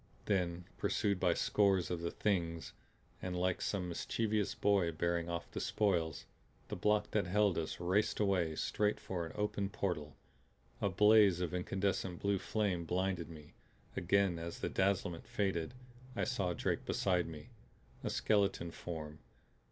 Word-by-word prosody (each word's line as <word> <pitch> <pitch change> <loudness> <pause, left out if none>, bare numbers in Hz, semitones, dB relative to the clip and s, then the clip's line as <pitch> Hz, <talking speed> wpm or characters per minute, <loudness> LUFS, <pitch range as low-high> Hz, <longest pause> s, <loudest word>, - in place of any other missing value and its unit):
Then 90 -3 0
pursued 100 -2 +1
by 90 -2 +3
scores 100 -4 +2
of 85 -2 -2
the 85 - -1
Things 85 -6 -1 0.5
and 90 -1 -3
like 90 0 0
some 95 -3 -1
mischievous 105 +4 -1
boy 100 -4 +3
bearing 85 +1 -1
off 85 0 -4
the - - -4
spoils, 85 -8 0 0.4
the - - -3
block 105 0 +1
that 105 -4 +1
held 100 0 +3
us 80 - -4
raced 90 +4 +1
away, 90 -6 +2
straight 105 +6 0
for 85 -3 -3
an - - -9
open 105 -1 -1
portal. 85 -8 -3 0.7
A 100 - +2
blaze 105 -1 +6
of 90 -1 -2
incandescent 95 0 -1
blue 100 -1 +1
flame 100 -6 0
blinded 90 -1 -1
me; 75 -2 -12 0.4
again 90 -1 +2
as 85 0 -5
the - - -2
dazzlement 95 -3 0
faded 95 0 -1 0.4
I - - 0
saw 95 -8 0
Drake - - -1
beside 90 -3 +1
me 75 -2 -9 0.5
a - - -1
skeleton 100 -5 +1
form. 75 -3 -6
90 Hz, 150 wpm, -35 LUFS, 85-100 Hz, 0.7 s, blaze